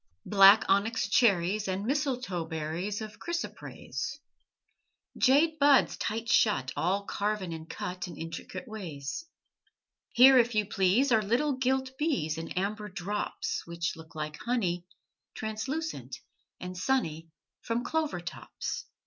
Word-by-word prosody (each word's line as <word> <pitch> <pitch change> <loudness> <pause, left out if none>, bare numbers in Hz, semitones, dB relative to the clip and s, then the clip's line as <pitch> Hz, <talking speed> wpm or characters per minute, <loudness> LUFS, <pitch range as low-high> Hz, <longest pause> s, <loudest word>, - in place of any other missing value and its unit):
Black 195 +1 +7
onyx 200 +4 +2
cherries 200 -2 +3
And 190 +2 -2
mistletoe 250 - -1
berries 160 +6 -3
Of 215 -1 -8
chrysoprase, 325 -3 -5 1.0
Jade 310 +4 +3
buds, 285 -1 +5
tight 225 +2 -3
shut, 205 - +3
All 195 +4 0
carven 200 -4 -2
and 160 0 -8
cut 180 0 -5
In 170 - -9
intricate 165 +10 -7
ways. 175 - -6 0.8
Here, 260 +2 +8
if 240 -1 +2
you 210 -1 +2
please 205 +7 +2
Are 220 -2 +5
little 240 +8 +1
gilt 260 0 0
bees 170 - 0
In 165 - -6
amber 210 +3 -2
drops 200 +2 -3
Which 170 0 -3
look 160 -1 -13
like 155 -1 -4
honey, 180 -8 -1 0.5
Translucent 260 +10 -4 0.4
and 180 0 -6
sunny, 165 -7 -1 0.3
From 230 +1 -2
clover 315 +1 -1
tops. - - -6
210 Hz, 125 wpm, -29 LUFS, 175-255 Hz, 1.0 s, Here